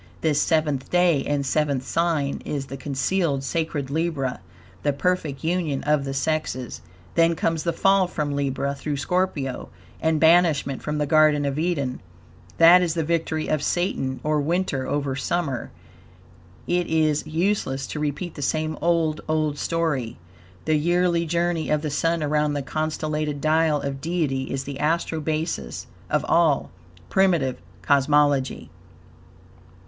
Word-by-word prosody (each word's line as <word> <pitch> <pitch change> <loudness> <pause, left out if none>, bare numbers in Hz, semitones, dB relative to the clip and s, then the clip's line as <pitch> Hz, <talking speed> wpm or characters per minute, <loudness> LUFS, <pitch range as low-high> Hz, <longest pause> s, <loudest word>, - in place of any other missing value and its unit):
This 150 -2 +2
seventh 150 -5 0
day 175 -6 +3
and 145 -1 -1
seventh 140 -2 0
sign 160 -5 0
is 140 -2 -3
the 135 - -7
concealed 140 +2 -1
sacred 145 -2 -2
Libra 150 -5 -1 0.4
the 145 - +1
perfect 155 -2 -1
union 160 -4 -1
of 150 -1 +1
the 135 - -3
sexes. 135 -3 -2 0.3
Then 165 0 +3
comes 165 0 0
the 170 - 0
fall 195 +1 +3
from 150 -5 -2
Libra, 140 0 -1
through 145 +1 -4
Scorpio, 145 -3 -1 0.3
and 160 -1 +2
banishment 160 -4 +3
from 150 0 -3
the 150 - 0
Garden 150 -1 +4
of 140 +1 -1
Eden. 145 -7 -1 0.6
That 170 +2 +8
is 170 -2 0
the 165 - 0
victory 160 -1 -1
of 155 -2 0
Satan, 145 -7 -1
or 150 -1 +1
Winter, 160 -4 -1
over 140 -2 -1
Summer, 140 -3 -2 1.0
etc. 180 0 +2
It 175 - -5
is 155 -2 +1
useless 155 -5 -1
to 150 - -5
repeat 150 +4 -3
the - - -8
same 155 +2 -1
old, 165 -3 +1
old 155 -2 0
story. 145 -9 -1 0.5
The 155 - +2
yearly 175 +1 +1
journey 170 0 0
of 150 0 +1
the 150 - -2
Sun 165 +3 0
around 150 0 +1
the 145 -1 -2
constellated 155 0 -2
dial 155 0 +2
of 140 -1 -4
Deity 155 -5 -1
is 135 0 -3
the 140 0 -7
Astro 160 +1 0
basis 155 - -3 0.2
of - - +1
all 160 -5 +2 0.4
primitive 170 -9 +2 0.2
cosmology. 145 -1 +2
155 Hz, 145 wpm, -24 LUFS, 140-165 Hz, 1.0 s, That